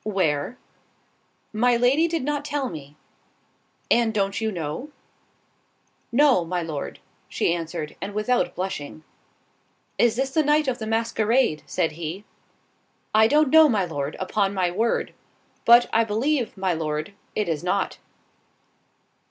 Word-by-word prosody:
"Where?" 190 0 -1 1.0
"My 240 +3 +3
Lady 265 +7 +3
did 330 -4 -2
not 290 +1 -2
tell 285 -3 -2
me." 150 -2 -10 0.9
"And 230 -2 +3
don't 195 +1 0
you 220 0 0
know?" 170 - -5 1.2
"No, 260 -6 +4
my 175 +1 -2
Lord:" 155 -4 -5 0.3
she - - 0
answered, 165 -2 -5
and 200 +1 -5
without 225 +4 0
blushing. 160 -5 -5 1.0
"Is 235 -2 +4
this 265 +2 -1
the 315 - +2
night 300 0 +2
of 255 -2 -1
the 220 - -5
masquerade?" 225 -4 +1
said 160 - 0
he. 165 +5 -6 0.9
"I 220 +1 +6
don't 295 +2 +3
know, 320 -1 +7
my 205 -6 +1
Lord, 145 -3 -4
upon 195 +1 0
my 180 -2 +1
word; 225 +6 -1 0.5
but, 235 +1 +7
I 230 - +4
believe, 235 +3 -1
my 190 -1 0
Lord, 155 +2 -3 0.2
it 210 - 0
is 160 -1 -2
not." 185 +2 -1
215 Hz, 135 wpm, -24 LUFS, 170-245 Hz, 1.2 s, know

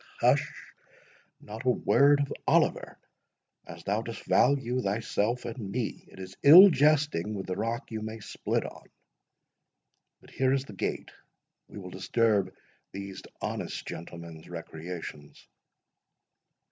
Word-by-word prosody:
"Hush! - - +3 0.9
not 110 +3 -9
a 130 - +2
word 140 +3 +4
of 140 - -2
Oliver, - - +1 0.7
as 85 0 -10
thou 105 +3 0
dost 115 0 -8
value 130 -2 +2
thyself 110 +2 -1
and 115 -4 -6
me. 120 0 -4
It - - -17
is 95 0 -9
ill 180 +7 +10
jesting 145 - +2
with 95 - -5
the 90 - -3
rock 115 +5 -3
you 110 -1 -4
may 110 +1 -6
split 100 - -3
on.—But - - -19
here 130 0 +1
is 135 0 0
the 105 - -11
gate—we 95 - -8
will 90 -2 -8
disturb 100 +1 +1 0.4
these 100 0 -7 0.2
honest - - -4
gentlemen's 85 -1 -9
recreations." 80 -3 -8
110 Hz, 120 wpm, -28 LUFS, 95-130 Hz, 0.9 s, ill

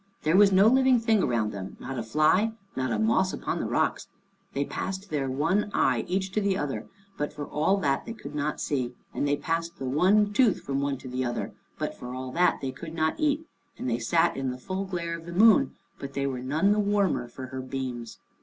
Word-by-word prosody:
There 155 +3 +3
was 200 0 +7
no 190 +1 +6
living 260 +1 +5
thing 225 -3 +3
around 115 -6 +1
them, 95 -1 -7
not 135 -2 -5
a - - -1
fly, 155 - +3 0.2
not 130 -1 -1
a - - +1
moss 220 -4 +2
upon - - -3
the - - -2
rocks. - - 0 0.5
They 140 +1 0
passed 190 +4 -5
their 140 -3 -1
one 165 +11 +1
eye 125 -3 +2
each 190 +1 -1
to 215 - 0
the 195 -2 +1
other, 145 -5 -3 0.3
but 145 - -1
for 145 -1 -6
all 160 +8 +1
that 140 -3 0
they 230 - -4
could - - -9
not 150 0 -2
see, 125 -4 -2 0.2
and 145 - -1
they 145 0 +2
passed 165 +1 -2
the 135 - -5
one 195 +10 +3
tooth 230 -2 +3
from 135 0 -2
one 140 -1 -1
to 130 - -10
the 130 +1 -2
other, 120 -1 -3 0.2
but - - -2
for 125 +1 -7
all 130 0 -5
that 180 +6 +2
they 135 -1 -2
could 165 +3 -9
not 160 -1 0
eat, 305 +1 +1 0.3
and - - -4
they 120 -1 0
sat 165 +8 +2
in 135 -1 -2
the 125 - -4
full 190 +9 -4
glare 170 -3 -3
of 165 0 -10
the - - -6
moon, 205 -7 +5 0.2
but 140 0 -7
they 140 0 -1
were 130 -2 -2
none 155 +10 +2
the 210 - +2
warmer 200 -10 +1
for 130 +2 -8
her 130 - -3
beams. 130 -3 -5
155 Hz, 230 wpm, -27 LUFS, 130-195 Hz, 0.5 s, was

